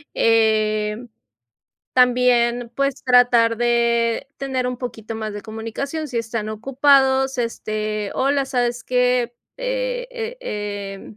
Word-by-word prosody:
em, 215 0 +2 0.8
también, 245 -1 +3
pues, 275 0 -1
tratar 245 -3 +4
de 235 +1 +1
tener 265 -2 -2
un 250 -1 -3
poquito 225 -3 -6
más 215 -1 -5
de 205 - -6
comunicación, 230 +8 -5
si 250 - -5
están 225 -2 -3
ocupados, 265 +3 +3
este, 215 -3 -3
hola, 275 0 +1
¿sabes 245 -2 -1
qué?, 250 -1 +1 0.2
eh - - -2
eh 480 0 -5
em, 205 - -6
240 Hz, 115 wpm, -21 LUFS, 220-265 Hz, 0.8 s, tratar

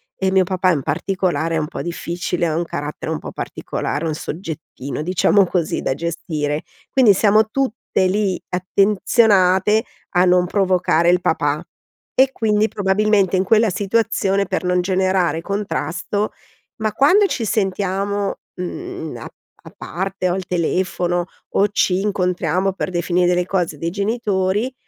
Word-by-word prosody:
e 190 - 0
mio 190 -1 +4
papà 185 0 +1
in 145 -6 -1
particolare 165 +1 -1
è - - +1
un 150 - -2
po' - - -6
difficile, 175 +1 -3
ha 155 - -1
un 170 - 0
carattere 150 0 -5
un 160 - -1
po' - - -8
particolare, 150 +4 -4
un 155 - -1
"soggettino", 155 -4 -6
diciamo 185 +4 +3
così, 170 -3 -1
da 130 - -1
gestire. 155 -2 -3 0.3
Quindi 250 -6 +6
siamo 215 +2 +4
tutte 235 -6 -1
lì 195 -1 0
attenzionate 195 +1 +3 0.3
a 180 +1 +5
non 180 0 +4
provocare 180 -3 +2
il 180 0 +3
papà 150 -1 0 0.5
e 265 +1 +4
quindi 215 -2 +1
probabilmente 200 -1 +2
in 185 - +2
quella 220 +3 +3
situazione, 200 -1 +1
per - - -2
non 180 0 +2
generare 185 -2 +1
contrasto 200 +1 -2 0.5
ma 215 -1 -1
quando 365 - +5
ci 240 - -2
sentiamo, 200 -1 -1 0.2
mhmm, 160 -5 -6
a 115 - -8 0.4
a - - -12
parte 190 +1 -3
o - - +1
al 190 - -3
telefono 175 0 0 0.3
o 200 - +3
ci 190 -2 +1
incontriamo 185 -2 0
per 190 - -3
definire 175 0 +1
delle 180 0 +2
cose 175 -5 -1
dei 165 +3 -3
genitori 205 +2 -1
185 Hz, 145 wpm, -20 LUFS, 175-205 Hz, 0.5 s, Quindi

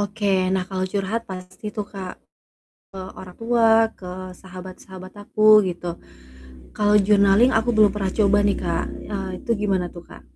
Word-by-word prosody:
Oke. 205 0 -1 0.2
Nah, 185 -1 0
kalau 185 -1 -2
curhat 205 +3 -2
pasti 185 +2 -9
tuh 210 - -2
Kak, 190 -2 -7 0.8
ke 195 - -9 0.2
orang 180 -1 -11
tua, 230 0 +2 0.3
ke 185 - -9 0.3
sahabat-sahabat 185 0 -11
aku, 215 +1 -1 0.2
gitu. 175 0 -5 0.9
Kalau 210 0 +3
journaling 205 +3 +5
aku 225 +2 -2
belum 215 -1 +6
pernah 195 -2 -2
coba 205 -1 +4
nih, 200 - +1
Kak, - - -1 0.3
eee, 195 -1 -3
itu 245 - -3
gimana 195 -3 0
tuh, 175 - -10
Kak? - - -13
195 Hz, 155 wpm, -22 LUFS, 185-210 Hz, 0.9 s, belum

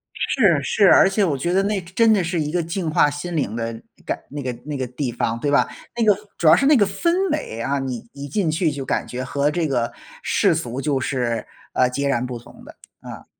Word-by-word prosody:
是 190 - +2
是， 200 +9 +3
而 - - +7
且 200 +2 +1
我 155 -7 +1
觉 170 +7 -1
得 195 +1 +3
那 205 0 0
真 175 +2 -16
真 225 -1 +5
的 200 -4 +2
是 170 0 -1
一 150 -1 -2
个 175 +1 +1
净 165 +1 -3
化 150 -1 +4
心 145 +4 -5
灵 115 -8 -1
的 115 -1 -4 0.2
感 - - -2
那 145 0 -6
个 130 -2 -2
那 150 -1 -4
个 130 - -2
地 125 +1 -3
方， 115 0 -2
对 145 +3 -1
吧？ 145 - +4 0.3
那 235 - 0
个 205 -3 +5 0.2
主 170 - +1
要 155 - +9
是 275 - +1
那 295 +2 +6
个 210 -6 +5
氛 350 - 0
围 295 - -3
啊， 140 +3 -1
你 130 -3 -4
一 140 0 -7
进 190 +1 0
去 160 +1 +1
就 140 -2 -5
感 - - -1
觉 125 +1 -5
和 140 +3 0
这 170 0 0
个 120 -4 -1 0.3
世 - - +2
俗 125 +3 -3
就 140 -2 0
是， 125 -3 -2 0.3
呃， 125 - +3
截 140 +2 -2
然 125 -3 0
不 125 -1 -5
同 115 - -16
的， - - -13 0.3
啊。 - - -10
145 Hz, 265 characters per minute, -22 LUFS, 130-185 Hz, 0.3 s, 要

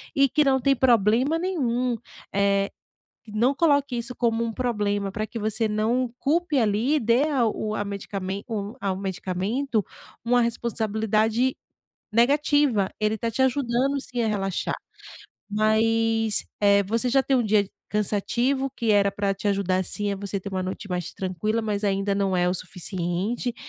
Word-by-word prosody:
e 275 0 +5
que 300 +4 +2
não 265 -2 +3
tem 275 +1 +3
problema 245 +4 +3
nenhum. 255 -9 0 0.4
Eh, 200 0 +2 0.5
que 220 - -13
não 240 +6 +2
coloque 285 -5 +2
isso 235 +1 -5
como 230 -1 +1
um 230 - -3
problema 205 -5 -1
para 215 0 -3
que 235 - -6
você 220 +1 0
não 230 +3 0
culpe 310 0 +1
ali 225 +6 +2
e - - +1
dê 235 +6 +3
a 255 -6 +2
o 215 0 -2
a 205 - -2
medicamen 200 -1 -4
o 210 0 -4
ao 190 -2 -1
medicamento 200 +5 -2 0.4
uma 245 +1 +3
responsabilidade 220 +1 0 0.6
negativa. 270 -3 +3
Ele 215 0 +1
está 230 +2 -2
te 230 - -4
ajudando 265 +1 +1
sim 245 -2 -3
a - - +1
relaxar, 195 -3 -1 0.8
mas, 225 +1 +2 0.2
eh, 200 0 +5
você 230 +5 0
já 270 +2 +4
tem 270 - +2
um 250 - +3
dia 210 -2 +2 0.2
cansativo 235 +6 0
que 230 -3 +1
era 200 -1 +4
para 200 0 -1
te 205 - -3
ajudar 190 -2 +1
sim, 205 +2 -2
é - - -2
você 200 0 -4
ter 200 +1 -7
uma 190 -1 -2
noite 190 +2 -5
mais 180 -2 -3
tranquila, 190 +4 -2
mas 210 -1 -2
ainda 195 0 +1
não 195 -2 +1
é 180 0 +2
o - - 0
suficiente. 185 +6 -3
220 Hz, 165 wpm, -25 LUFS, 200-245 Hz, 0.8 s, e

